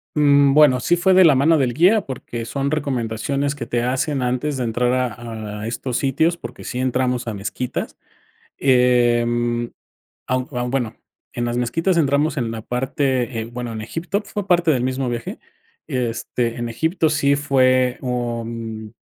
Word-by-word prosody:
Mm, 140 -2 +5
bueno, 145 -4 +6
sí 175 +5 +2
fue 190 +2 +3
de 185 0 +7
la 155 -5 +6
mano 155 +4 +4
del 125 -4 +1
guía, 185 - +4
porque 120 -5 -6
son 140 +3 -2
recomendaciones 140 0 -1
que 125 - -5
te 120 0 -1
hacen 130 +2 -1
antes 130 +3 -1
de 125 - -1
entrar 120 +2 0
a 115 -4 -4
a 110 - -4
estos 125 +1 -3
sitios, 160 +5 +1
porque - - -9
sí 125 - -4
entramos 125 -1 0
a 115 - -2
mezquitas. 105 +5 -4 0.6
Em, 120 -2 +2 0.6
aun 130 0 -1
aun, 125 -1 -3
bueno, 125 -5 -1 0.4
en 120 0 -2
las 120 0 -2
mezquitas 165 +9 0
entramos 145 +1 +2
en 115 -3 -1
la 115 -1 -5
parte 130 0 -1
en, 115 +2 -8
bueno, 120 -1 -5
en 110 - -5
Egipto 175 - -3
fue 205 -1 -5
parte 175 -2 +3
del 125 -3 0
mismo 130 0 -1
viaje, 120 -1 -5 0.5
este, 120 -1 -2
en 120 0 -3
Egipto 160 +6 0
sí 140 -2 +2
fue, 130 -3 +2
mm, - - -8
un 115 -2 -4
125 Hz, 170 wpm, -21 LUFS, 120-140 Hz, 0.6 s, de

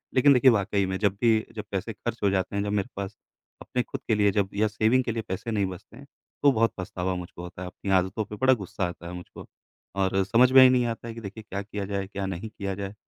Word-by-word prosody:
लेक़िन 140 +2 +6
देखिए 130 0 +6
वाक़ई 100 -2 +1
में 95 0 -2
जब 100 -2 +2
भी 115 -2 +3
जब 105 - -4
पैसे 100 +3 -3
ख़र्च 115 +2 -5
हो 100 - +4
जाते 95 0 -1
हैं, 100 - 0
जब 105 - -2
मेरे 100 -2 -1
पास 100 +1 -5 0.4
अपने 125 - -1
ख़ुद 135 - -7
के 110 - +3
लिए 105 -1 +3
जब 100 -1 0
या 105 +2 +2
सेविंग 110 +4 +2
के 120 - -2
लिए 115 0 -2
पैसे 95 +5 -4
नहीं 105 -3 +1
बचते 95 -2 -9
हैं - - -12 0.4
तो 140 - +7
बहुत 115 -2 +2
पछतावा 95 0 -3
मुझको 90 -1 -8
होता 90 +1 -9
है। 90 - -4
अपनी 95 +1 -5
आदतों 95 +4 -2
पे 105 - -8
बड़ा 130 +4 +4
गुस्सा 95 -4 -3
आता 85 0 -8
है 90 - -7
मुझको 90 0 -10 0.6
और 95 0 +2
समझ 120 +6 +4
में 130 0 +9
ही 130 - +8
नहीं 125 -1 +3
आता 115 - -11
है 115 - -5
कि 115 - -9
देखिए 105 +1 -8
क्या 100 +1 -3
किया 100 0 -5
जाए, 100 -1 -3
क्या 100 0 -4
नहीं 95 +3 -5
किया 100 -2 -4
जाए? 100 +1 -5
100 Hz, 265 wpm, -26 LUFS, 95-115 Hz, 0.6 s, में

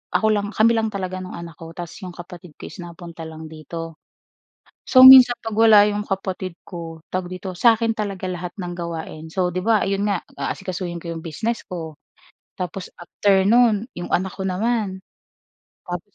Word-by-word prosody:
ako 220 - +3
lang 205 -1 0
kami 225 +2 +5
lang 220 0 +1
talaga 185 -1 -4
nung 185 0 -7
anak 170 -1 -9
ko 165 0 -9
tapos 175 -1 -7
'yong 180 -3 -8
kapatid 175 -2 -11
ko - - -12
is - - -12
napunta 170 -1 -9
lang 160 0 -9
dito. 165 +1 -8 0.9
So, 255 0 +9
minsan 255 -2 +10
pag 225 -2 -6
wala 215 -2 +7
'yong 210 0 -1
kapatid 190 -3 -4
ko, 165 -3 -8 0.2
tawag 185 -1 -2
dito, 185 0 -6
sa'kin 225 +3 +3
talaga 200 -3 -4
lahat 180 -1 -4
ng 175 -1 -5
gawain. 160 -2 -6
So, 180 -1 -1
'di 185 - -2
ba, 220 -2 +2
ayun 195 0 -1
nga, 200 - +1 0.2
aasikasuhin 180 -2 -4
ko 170 0 -6
'yong 165 - -7
business 230 +8 -3
ko 165 -4 -7 0.6
tapos 180 +1 -5
after 190 +2 +1
no'n, 230 -1 +4
'yong 175 - -5
anak 190 0 0
ko - - -5
naman. 200 +1 -1 0.9
Tapos 175 -1 -5
185 Hz, 180 wpm, -22 LUFS, 170-210 Hz, 0.9 s, minsan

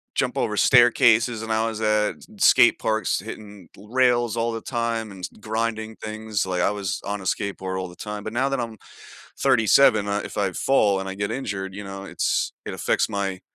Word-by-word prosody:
jump - - 0
over - - -1
staircases 120 -1 +4
and 110 - -5
I 110 +1 +1
was 110 -1 -5
at 105 -1 +1
s - - -16 0.2
skate 120 - +6
parks 110 0 0
hitting 105 -3 -10
l 100 - -14
rails 120 -2 +2
all 115 0 0
the 115 - -5
time 115 -3 -2
and 95 - -11
s 90 - -3
grinding 110 0 -3
things. 110 -1 -3
Like, 90 -1 -1
I - - +2
was 100 -2 -3
on 100 0 -3
a - - -9
skateboard 95 -1 -2
all 95 - -4
the 90 - -13
time, 105 +2 -6
but 110 - -6
now 130 +3 +1
that 135 - -1
I'm 115 -2 -5 0.6
37, 115 -4 +4
uh, 100 0 -1
if - - -8
I 95 -2 0
fall 105 -6 +2
and 95 - -5
I 95 - -4
get 100 +1 -3
injured, 95 -6 -4
you 105 - -6
know, 95 0 -7
it's - - -1
it - - -5
affects - - 0
my 95 -2 -3
110 Hz, 215 wpm, -23 LUFS, 100-115 Hz, 0.6 s, skate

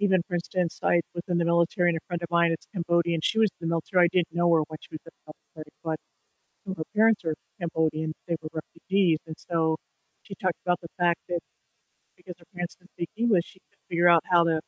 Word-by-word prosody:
even 190 -3 +4
for 175 - -5
instance, 175 0 -1
I 175 - +4
was 170 - -4
in 175 - +1
the 170 - +2
military 170 +1 +3
and 165 - -1
a - - -18
friend 175 -1 -2
of 170 - -5
mine 170 0 +4
is 165 - -3
Cambodian, 170 -2 +1
she 220 - +1
was 220 -1 +5
in 165 - -3
the - - 0
military, 175 +2 +3
I - - +2
didn't 175 -3 +1
know 175 0 +2
her 165 - +5
when 155 -1 -7
she - - -15
was 155 - -6
in 165 - -12
the 155 - -11 0.2
military, 155 -2 -10
but 160 -1 -5 0.6
her 160 - -3
parents 220 -2 +4
are 160 -1 0 0.3
Cambodian, 160 -2 0
they 170 - 0
were 155 - -5
refugees, 165 +2 0
and 160 - -7
so 160 -2 +2 0.5
she 195 - -9
talked 185 -2 -1
about 180 0 +2
the 170 - -8
fact 175 -1 +2
that 175 - 0 0.8
because 180 0 -10
her 170 - -20
parents 175 -1 -4
didn't 180 0 -25
speak 170 - -5
English, 215 -6 +3
she 185 - -18
had - - -39
to - - -44
figure 175 +1 +4
out 170 -1 +7
how 175 -1 +6
to 165 -1 +2
170 Hz, 240 wpm, -27 LUFS, 165-180 Hz, 0.8 s, out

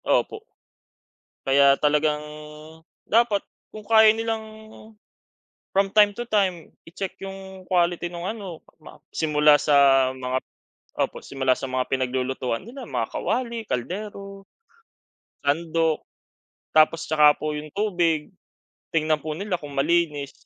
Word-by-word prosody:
Opo. 435 - 0 1.1
Kaya 140 +1 +6
talagang 150 0 +2 0.9
dapat 220 -3 +3 0.3
kung 215 - -8
kaya 220 0 +6
nilang, 225 0 -2 1.3
from 195 0 +2
time 205 0 +5
to 240 +3 -6
time 190 -5 0 0.2
i-check 185 +3 -6
yung 190 -1 -9
quality 175 -1 +1
nung 175 +1 -5
ano 195 -7 -6 0.2
ma 155 - -15
simula 150 -1 +4
sa 140 -2 +4
mga 130 0 -3 0.7
opo, - - -11
simula 130 -1 0
sa 135 - -6
mga 130 0 -1
pinaglulutuan 130 - -2
nila 260 +3 -9
mga - - -1
kawali, 235 -2 -2
kaldero, 195 - -5 1.0
sandok. 160 +2 +1 0.7
Tapos 155 +1 +4
'tsaka 150 -1 +5
po 155 0 -3
yung 150 0 -6
tubig 175 -7 0 0.6
tignan 155 -1 +1
po 155 - -4
nila 200 -1 -2
kung 145 -1 -8
malinis 150 -2 +1
165 Hz, 115 wpm, -24 LUFS, 145-200 Hz, 1.3 s, Kaya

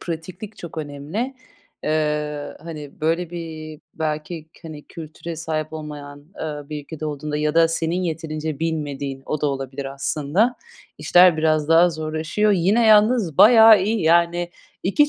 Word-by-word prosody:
pratiklik 180 +6 -7
çok 165 -2 -8
önemli. 155 - -4 0.5
Eee, 150 -1 -1
hani, 150 -3 -9
böyle, 165 +2 0
bir 160 -3 -7
belki 155 +1 -4
k - - -20
hani, 150 -2 -10
kültüre 165 +1 -8
sahip 155 -1 -3
olmayan, 145 -2 -8
aaa, 150 -2 -6
bir 150 -1 -5
ülke 155 0 -4
olduğunda 150 0 -4
ya 150 0 0
da 165 0 +5
senin 165 +2 -1
yeterince 155 -3 -4
bilmediğin, 145 -4 -3
o 150 - -2
da - - +1
olabilir 135 0 -4
aslında, 150 - 0 0.4
işler 180 -2 +5
biraz 155 -1 +1
daha 165 +2 +6
zorlaşıyor. 160 +6 -1
Yine 200 +6 +3
yalnız 215 - +4
bayağı 220 -2 +8
iyi. 215 +3 0
Yani 170 +1 +2 0.3
2 290 +11 +3
160 Hz, 145 wpm, -22 LUFS, 150-175 Hz, 0.5 s, bayağı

